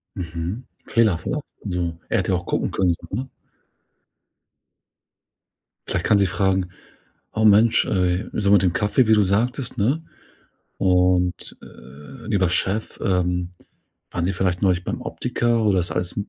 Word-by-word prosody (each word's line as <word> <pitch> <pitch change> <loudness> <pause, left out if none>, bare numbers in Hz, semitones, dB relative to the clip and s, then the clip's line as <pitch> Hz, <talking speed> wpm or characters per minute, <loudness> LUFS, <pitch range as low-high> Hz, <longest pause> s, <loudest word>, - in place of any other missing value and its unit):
Mhm, 85 +7 -5 0.2
Fehlerverlauf? 110 - +1 0.2
So 90 -4 -3
er - - +1
hätte - - -1
ja - - +2
auch 85 - -8
gucken - - -1
können, 90 -2 +1
so, - - -11
ne? 130 +2 -4 2.6
Vielleicht - - -2
kann 105 - +4
sie 100 -1 +3
fragen: 95 0 0 0.6
„Oh 110 - 0
Mensch, 110 +2 +5
ey“ 90 +1 0
so 100 -2 0
mit 100 -2 +6
dem 90 -2 +2
Kaffee, 105 +6 +2
wie 110 - +4
du 105 - +4
sagtest, 120 +6 0
ne? 130 +11 +1 0.8
Und, 90 -1 +1
äh: 75 - -13
„Lieber 95 -5 +2
Chef, 100 +4 -1
ähm, 90 -1 0 0.6
waren 85 -1 -2
sie 95 - 0
vielleicht 90 -1 -1
neulich 90 -2 +2
beim - - -4
Optiker 120 -1 -1
oder 100 -3 +3
ist 85 - -3
alles 90 -1 -3
95 Hz, 145 wpm, -22 LUFS, 90-110 Hz, 2.6 s, mit